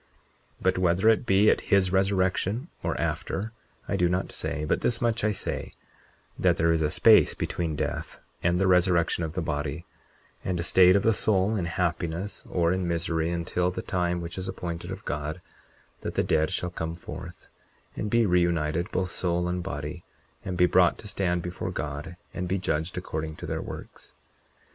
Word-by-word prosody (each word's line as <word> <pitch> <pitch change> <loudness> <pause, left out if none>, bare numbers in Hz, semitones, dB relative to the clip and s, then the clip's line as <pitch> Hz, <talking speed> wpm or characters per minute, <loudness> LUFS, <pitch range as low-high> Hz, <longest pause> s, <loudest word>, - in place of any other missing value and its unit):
40:21 - - -12
But 95 0 +2
whether 90 +4 +3
it 115 +2 +2
be 100 +1 +5
at - - 0
his 95 -2 +2
resurrection 95 - +1
or - - -2
after, 110 +3 -2 0.4
I - - 0
do 90 -2 +2
not 90 +1 -1
say; 80 -1 -3
but - - 0
this 115 -1 +1
much 115 -2 0
I 110 - +3
say, 100 - -3 0.7
that - - +3
there 85 0 +3
is 80 -1 +2
a 75 - +2
space - - +6
between 80 -3 -2
death - - -3 0.2
and 85 +1 +2
the 95 - +3
resurrection 90 -2 +3
of 80 -1 -3
the 90 - -1
body, 75 +2 -3 0.6
and 90 -2 -1
a - - -1
state 90 +1 +6
of 100 - +3
the 115 - +4
soul 100 +1 +2
in 95 -5 -1
happiness 85 +2 -2
or 85 -1 +2
in 95 -1 -1
misery 85 -1 0
until 85 +1 0
the 90 - -5
time 90 -1 -1
which 85 +2 -5
is 95 - -4
appointed 85 -2 -5
of 95 +2 -7
God 75 +3 -3 0.6
that - - -5
the - - +2
dead 80 0 +2
shall 90 - -2
come 80 -1 -4
forth, 85 - -9 0.5
and 105 - -3
be 115 +1 +3
reunited, 85 -3 +1
both 90 -1 -1
soul 90 -1 0
and 90 0 -1
body, 75 +1 -5 0.4
and 90 - -4
be 90 - +6
brought 90 -1 +4
to 105 - -9
stand 90 -4 -1
before 90 0 -4
God, 75 +4 -5 0.2
and 90 - -3
be 95 +2 0
judged 80 -2 -2
according 80 0 -4
to - - -8
their - - -3
works. - - -9
90 Hz, 190 wpm, -27 LUFS, 85-95 Hz, 0.7 s, space